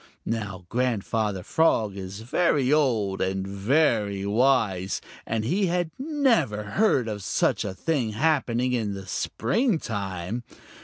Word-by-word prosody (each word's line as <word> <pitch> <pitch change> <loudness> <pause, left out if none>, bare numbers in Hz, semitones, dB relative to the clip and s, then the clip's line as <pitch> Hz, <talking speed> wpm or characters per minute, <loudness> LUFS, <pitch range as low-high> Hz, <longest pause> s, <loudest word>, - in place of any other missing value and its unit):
Now 100 -5 -4
Grandfather 110 -4 -1
Frog 110 -11 +2
is 95 +1 -7
very 140 +2 +2
old 115 -10 +1
and 95 0 -1
very 100 -1 +1
wise, 105 -4 +2 0.3
and 110 -1 -1
he 190 - +1
had 175 -1 0
never 255 - +1
heard 130 - +2
of 105 -2 -4
such - - +1
a 95 -2 -4
thing 130 -5 -1
happening 125 -2 +1
in 110 -5 -1
the 95 -1 -8
springtime. 110 - -1
115 Hz, 120 wpm, -26 LUFS, 100-145 Hz, 0.3 s, Frog